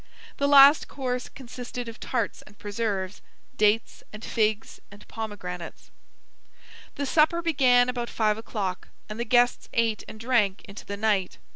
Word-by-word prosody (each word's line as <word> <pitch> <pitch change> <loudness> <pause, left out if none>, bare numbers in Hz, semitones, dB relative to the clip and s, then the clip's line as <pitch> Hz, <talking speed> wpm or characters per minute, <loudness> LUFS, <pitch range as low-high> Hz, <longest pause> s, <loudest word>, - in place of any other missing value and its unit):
The 280 - +1
last 285 +1 +7
course 250 -2 -4
consisted 245 -1 -8
of 230 0 -9
tarts 235 -5 -3
and 205 - -18
preserves, 205 -2 -3 0.3
dates 215 +2 +1
and 215 +1 -9
figs 215 -1 -1
and 205 +1 -16
pomegranates. 180 -6 -7 1.0
The 285 - -2
supper 315 +4 +2
began 255 -6 +4
about 245 -1 -3
five 215 -1 0
o'clock, 200 -5 -4 0.2
and 215 +1 -7
the 235 - -1
guests 245 +1 +2
ate 230 -2 0
and 215 - -10
drank 225 -5 +1
into 200 0 -11
the 200 - -5
night. 205 -3 0
225 Hz, 145 wpm, -26 LUFS, 210-250 Hz, 1.0 s, last